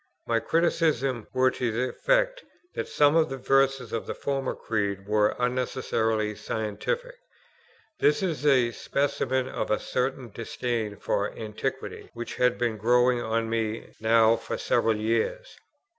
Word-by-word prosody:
My 115 Hz, -1 st, +1 dB
criticisms 145 Hz, -7 st, +1 dB
were 130 Hz, 0 st, +3 dB
to 125 Hz, -2 st, -2 dB
the 125 Hz, +3 st, -1 dB
effect -, -, +1 dB, 0.3 s
that -, -, -3 dB
some 145 Hz, +1 st, +4 dB
of 160 Hz, -1 st, +4 dB
the 135 Hz, -, -4 dB
verses 135 Hz, -2 st, +2 dB
of 115 Hz, -, -3 dB
the -, -, -4 dB
former 135 Hz, -2 st, -2 dB
Creed 100 Hz, -3 st, -2 dB
were 105 Hz, 0 st, +2 dB
unnecessarily 120 Hz, -3 st, 0 dB
scientific. 110 Hz, -, -3 dB, 0.8 s
This 150 Hz, +6 st, +3 dB
is 160 Hz, -7 st, -2 dB
a 130 Hz, -5 st, +4 dB
specimen 130 Hz, -1 st, -1 dB
of -, -, -3 dB
a 105 Hz, -, +3 dB
certain 130 Hz, -2 st, -2 dB
disdain 115 Hz, -1 st, -3 dB
for 100 Hz, +1 st, -1 dB
Antiquity 115 Hz, +5 st, -5 dB
which 120 Hz, 0 st, -5 dB
had 125 Hz, -1 st, +3 dB
been 120 Hz, -2 st, -1 dB
growing 120 Hz, +3 st, +3 dB
on 115 Hz, 0 st, -1 dB
me 110 Hz, -1 st, -2 dB
now 110 Hz, 0 st, +5 dB
for 115 Hz, -, -5 dB
several 110 Hz, -1 st, +2 dB
years. 115 Hz, -, -1 dB
125 Hz, 145 wpm, -27 LUFS, 110-135 Hz, 0.8 s, now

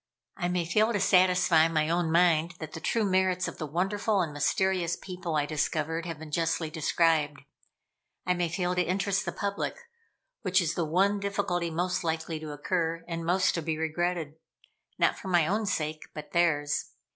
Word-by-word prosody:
I 175 Hz, -2 st, -2 dB
may 180 Hz, -1 st, 0 dB
fail 215 Hz, +7 st, +2 dB
to 205 Hz, -, +1 dB
satisfy 180 Hz, -3 st, +4 dB
my 155 Hz, -2 st, +1 dB
own 170 Hz, 0 st, 0 dB
mind 170 Hz, 0 st, +3 dB
that 155 Hz, -2 st, -7 dB
the -, -, -5 dB
true 220 Hz, +6 st, 0 dB
merits 185 Hz, -1 st, +1 dB
of -, -, -7 dB
the 155 Hz, -, -3 dB
wonderful 195 Hz, +6 st, 0 dB
and 160 Hz, -4 st, -2 dB
mysterious 175 Hz, +3 st, +1 dB
people 180 Hz, -3 st, -5 dB
I 145 Hz, -1 st, +2 dB
discovered, 155 Hz, +2 st, -2 dB
have 165 Hz, -2 st, -5 dB
been 155 Hz, 0 st, -10 dB
justly 165 Hz, 0 st, 0 dB
described. 155 Hz, -2 st, +1 dB, 0.8 s
I 180 Hz, -, +2 dB
may 175 Hz, -1 st, -1 dB
fail 180 Hz, +1 st, -1 dB
to 180 Hz, -, +1 dB
interest 195 Hz, +2 st, 0 dB
the -, -, -2 dB
public; 200 Hz, 0 st, -3 dB, 0.7 s
which 185 Hz, -3 st, +2 dB
is 170 Hz, -3 st, 0 dB
the 170 Hz, -, -1 dB
one 195 Hz, +6 st, +2 dB
difficulty 195 Hz, -4 st, -1 dB
most 180 Hz, +3 st, -1 dB
likely 160 Hz, -1 st, -2 dB
to 155 Hz, -1 st, -7 dB
occur, 165 Hz, +2 st, -2 dB
and 165 Hz, -1 st, -4 dB
most 180 Hz, +3 st, +2 dB
to 170 Hz, -, -2 dB
be 160 Hz, 0 st, -2 dB
regretted 160 Hz, -1 st, -2 dB, 0.6 s
not -, -, +2 dB
for -, -, -8 dB
my 175 Hz, -4 st, +3 dB
own 210 Hz, +5 st, 0 dB
sake, 155 Hz, -4 st, -2 dB
but 150 Hz, -1 st, -8 dB
theirs. 150 Hz, -4 st, +1 dB
170 Hz, 180 wpm, -28 LUFS, 160-185 Hz, 0.8 s, satisfy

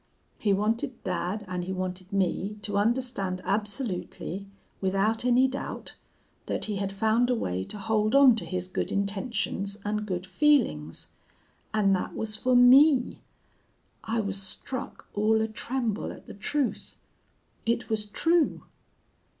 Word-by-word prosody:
He 205 Hz, -, +1 dB
wanted 225 Hz, +6 st, 0 dB
dad 185 Hz, +3 st, -2 dB
and 180 Hz, -1 st, -3 dB
he 190 Hz, -, -4 dB
wanted 185 Hz, 0 st, -4 dB
me 195 Hz, +1 st, 0 dB
to 205 Hz, -, -3 dB
understand 205 Hz, -4 st, 0 dB
absolutely, 200 Hz, -3 st, -2 dB, 0.3 s
without 200 Hz, +5 st, +1 dB
any 250 Hz, +1 st, +5 dB
doubt, 265 Hz, +1 st, -6 dB, 0.5 s
that -, -, -1 dB
he 210 Hz, -2 st, -2 dB
had 195 Hz, 0 st, -2 dB
found 220 Hz, +5 st, +2 dB
a 250 Hz, -, +3 dB
way 90 Hz, -, -2 dB
to 210 Hz, -, -5 dB
hold 215 Hz, +2 st, +1 dB
on 275 Hz, -4 st, +8 dB
to -, -, -2 dB
his 185 Hz, -1 st, -3 dB
good 185 Hz, -, -3 dB
intentions 200 Hz, 0 st, -1 dB
and 210 Hz, 0 st, -2 dB
good 180 Hz, -2 st, -3 dB
feelings. 185 Hz, -, +1 dB, 0.6 s
And 200 Hz, -3 st, +3 dB
that 185 Hz, -, -4 dB
was 215 Hz, -1 st, -1 dB
for 250 Hz, +4 st, +1 dB
me!... 255 Hz, +2 st, +6 dB, 0.8 s
I 225 Hz, +1 st, -1 dB
was 200 Hz, -1 st, -2 dB
struck 240 Hz, +6 st, -4 dB
all 215 Hz, +2 st, +3 dB
a 220 Hz, -, +1 dB
tremble 230 Hz, 0 st, -2 dB
at -, -, -12 dB
the -, -, -10 dB
truth. 265 Hz, +6 st, -2 dB, 0.7 s
It 235 Hz, +1 st, 0 dB
was 215 Hz, -2 st, 0 dB
true! 325 Hz, +10 st, +2 dB
210 Hz, 140 wpm, -27 LUFS, 195-240 Hz, 0.8 s, on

